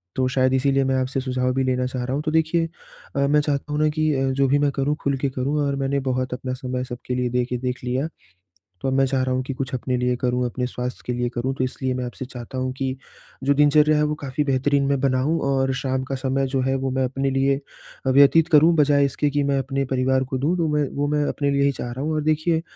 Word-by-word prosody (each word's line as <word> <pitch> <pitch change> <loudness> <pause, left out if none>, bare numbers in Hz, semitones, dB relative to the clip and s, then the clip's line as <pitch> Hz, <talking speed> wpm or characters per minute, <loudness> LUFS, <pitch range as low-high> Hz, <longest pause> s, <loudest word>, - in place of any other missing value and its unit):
तो 130 0 +1
शायद 130 0 +2
इसीलिए 135 +1 +2
मैं 135 0 +1
आपसे 130 +1 -2
सुझाव 125 -1 -1
भी 135 +1 +1
लेना 125 -1 0
चाह 125 0 -3
रहा 130 +1 -3
हूँ। 145 - -1
तो 155 - 0
देखिए 160 +1 +2 0.5
अ, - - 0
मैं 150 +1 +4
चाहता 145 0 -2
हूँ 150 - 0
ना 155 - +4
कि 155 0 0
अ, 135 0 +1
जो 135 +1 +2
भी 140 +2 +3
मैं 145 -1 +2
करूँ 140 +2 0
खुल 140 -1 0
के 135 +1 -1
करूँ 130 +3 -2
और 140 0 0
मैंने 140 0 0
बहुत 130 0 -1
अपना 130 0 -4
समय 125 -1 -3
सबके 125 0 -5
लिए 125 -1 0
देके 125 0 -1
देख 125 0 -4
लिया, 130 +4 -1 0.7
तो 135 - -2
अब 130 - +1
मैं 135 0 +4
चाह 130 0 0
रहा 130 - 0
हूँ 130 - -1
कि 135 - -4
कुछ 130 -1 -5
अपने 125 0 -1
लिए 125 0 +1
करूँ 125 0 +1
अपने 125 +1 -2
स्वास्थ्य 125 0 -5
के 125 - -2
लिए 120 0 -1
करूँ, 125 +2 -2
तो 130 - -1
इसलिए 130 0 -2
मैं 125 0 -3
आपसे 125 +2 -6
चाहता 125 0 -8
हूँ 130 0 -1
कि 130 -1 -2 0.5
जो 140 - +3
दिनचर्या 150 +1 +4
है 150 - +3
वो 150 0 0
काफ़ी 140 +1 -1
बेहतरीन 140 +1 +1
मैं 140 -1 +1
बनाऊँ 135 +4 +1
और 135 -1 +1
शाम 130 0 -1
का 135 +1 -4
समय 135 0 0
जो 130 0 -1
है 135 +1 0
वो 135 0 -1
मैं 130 0 0
अपने 135 +2 -1
लिए 135 +1 +2 0.5
व्यतीत 140 +5 +6
करूँ, 165 +1 +5
बजाए 145 -2 +4
इसके 145 +2 0
कि 145 0 0
मैं 140 0 +1
अपने 135 +1 -2
परिवार 130 0 +1
को 130 - -1
दूँ 155 +7 +1
तो 165 -2 +1
मैं 150 -2 +1
वो 145 +1 0
मैं 150 0 +1
अपने 140 -1 0
लिए 140 0 +2
ही 140 - +3
चाह 120 -2 -5
रहा 130 - -5
हूँ। 160 - -1
और 155 - 0
देखिए 155 +1 +1
135 Hz, 265 wpm, -23 LUFS, 130-145 Hz, 0.7 s, व्यतीत